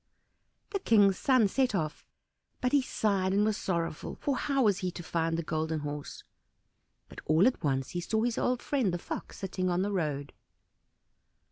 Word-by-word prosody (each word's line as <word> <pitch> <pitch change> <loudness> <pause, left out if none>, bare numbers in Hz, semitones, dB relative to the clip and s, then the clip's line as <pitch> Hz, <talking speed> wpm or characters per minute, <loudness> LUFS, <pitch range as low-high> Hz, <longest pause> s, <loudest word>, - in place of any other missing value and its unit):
The 395 - -1
King's 205 - +4
son 255 -6 +4
set 255 +2 +1
off, 155 -4 -2 0.6
but 250 - 0
he 285 - +4
sighed 195 -6 0
and 205 +1 +3
was 215 -1 +1
sorrowful, 170 -6 -3
for 280 - -1
how 275 -1 +1
was 205 -4 +3
he 185 - -1
to 175 0 -8
find 165 0 -1
the 170 - -2
Golden 155 0 -2
Horse? 145 0 -6 0.8
But - - -11
all 155 +4 +5
at 250 -7 +1
once 135 -3 0
he 175 - -3
saw 220 +5 0
his 240 -1 0
old 250 -1 0
friend 260 -10 +1
the 175 - -1
Fox - - -7
sitting 185 -1 -2
on 180 +1 +1
the 205 - -1
road. 150 -7 -2
190 Hz, 180 wpm, -30 LUFS, 165-225 Hz, 0.8 s, all